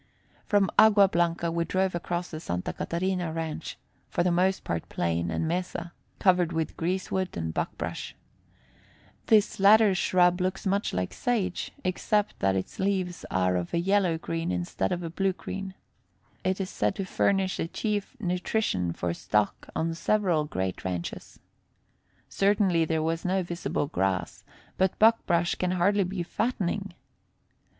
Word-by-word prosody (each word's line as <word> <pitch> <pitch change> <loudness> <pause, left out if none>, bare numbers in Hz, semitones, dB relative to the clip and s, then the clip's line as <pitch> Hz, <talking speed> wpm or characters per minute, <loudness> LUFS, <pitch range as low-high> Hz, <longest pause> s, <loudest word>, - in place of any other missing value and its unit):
From 200 -3 +3
Agua 210 -2 +7
Blanca 170 -2 0
we 170 0 0
drove 185 +2 0
across 175 +1 -3
the 155 - -5
Santa 90 - -3
Catarina 175 -1 -2
ranch, 160 -1 -4 0.3
for 175 - 0
the 180 - +2
most 185 +2 +2
part 85 -1 -3
plain 85 0 -1
and 160 - -1
mesa, 175 0 -3 0.2
covered 180 -3 +3
with 160 -1 -2
greasewood 185 - -2
and 80 -1 -3
buckbrush. - - -4 1.1
This 210 -3 +4
latter 210 +1 +6
shrub 180 0 +3
looks 185 +2 -2
much 200 +2 +1
like 90 0 -2
sage, 205 -7 -1
except 205 +3 0
that 95 0 +2
its 95 - -4
leaves 190 -2 -1
are 90 -1 +1
of 90 - -2
a - - +2
yellow 185 -2 +2
green 165 - -3
instead 90 +2 -2
of 175 0 -2
a 165 - -3
blue 195 +2 0
green. 195 +1 -6 0.7
It 185 +1 0
is 190 0 -3
said - - 0
to 195 - -3
furnish 190 0 +1
the - - -2
chief 210 +6 -3
nutrition 180 - -1
for 85 0 -2
stock 105 +4 -1
on 165 +1 0
several 175 -3 +1
great 95 -9 -3
ranches. 90 -2 -5 0.9
Certainly 195 -4 +2
there 160 0 0
was 165 +1 -1
no 185 +1 +1
visible 170 -3 -2
grass, 95 -7 -2 0.4
but 190 -1 +2
buckbrush 195 -6 +3
can 180 0 0
hardly 195 +2 +2
be 180 -1 -3
fattening. 200 0 -2
175 Hz, 150 wpm, -27 LUFS, 160-195 Hz, 1.1 s, Agua